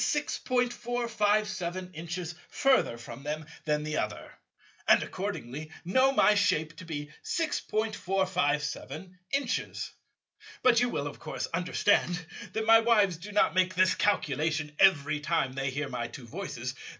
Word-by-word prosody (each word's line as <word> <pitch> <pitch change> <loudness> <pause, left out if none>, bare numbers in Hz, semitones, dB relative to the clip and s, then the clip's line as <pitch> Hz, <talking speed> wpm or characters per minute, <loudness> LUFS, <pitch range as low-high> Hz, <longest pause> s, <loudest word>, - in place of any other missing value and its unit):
457 215 -9 0
inches 170 +2 -5 0.2
further 265 - +2
from 120 +2 -9
them 150 +2 -4 0.2
than 150 -1 +1
the 155 0 -2
other, - - -3 0.6
and - - +6
accordingly 145 +6 -5 0.2
know 260 +9 +4
my 240 -5 +5
shape 165 -6 +1
to 170 - -9
be 150 -2 -5
6.457 190 - -1 0.2
inches. 275 -4 -2 0.7
But 240 -2 +6
you 245 - +2
will 145 -10 -2
of 145 - -6
course - - -4
understand 175 0 +1 0.3
that 220 0 -1
my 225 0 +8
wives 210 -6 +3
do 195 +5 -9
not 205 - +3
make 185 -1 +2
this 185 +1 +4
calculation 155 -5 0
every 155 -5 +4
time 150 -4 0
they 135 0 -1
hear 145 +2 -3
my 125 -3 -3
two 125 - -10
voices. 130 -4 -5
180 Hz, 135 wpm, -29 LUFS, 150-215 Hz, 0.7 s, my